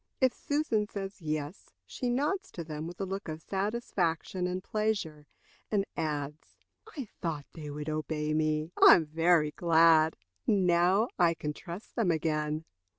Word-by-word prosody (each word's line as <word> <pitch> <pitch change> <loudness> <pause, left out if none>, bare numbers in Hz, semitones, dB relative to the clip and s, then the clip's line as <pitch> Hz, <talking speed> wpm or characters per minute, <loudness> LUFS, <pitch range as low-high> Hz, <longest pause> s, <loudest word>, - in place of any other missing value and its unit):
If 260 -2 +3
Susan 285 -8 0
says 195 -1 -6
yes, 155 +1 -4
she 250 - -3
nods 295 +11 0
to 170 - -5
them, 155 0 -5
with 175 0 -9
a 195 - -1
look 195 +1 -5
of 155 0 -5
satisfaction 190 -3 -1
and 185 +1 -3
pleasure, 200 -10 -2 0.4
and 200 -2 +1
adds: 150 -1 -4 0.4
"I 275 - -3 0.2
thought 155 -5 -3
they 155 -3 -7
would 150 +1 -6
obey 155 0 -2
me. 155 +1 0
I - - +11
am 165 - +1
very 160 0 +3
glad. 160 -1 +4 0.3
Now 185 +2 +3
I 170 -2 +4
can 150 -2 -4
trust 175 +7 -9
them 225 -6 +1
again." 155 -1 0
165 Hz, 150 wpm, -30 LUFS, 155-195 Hz, 0.4 s, I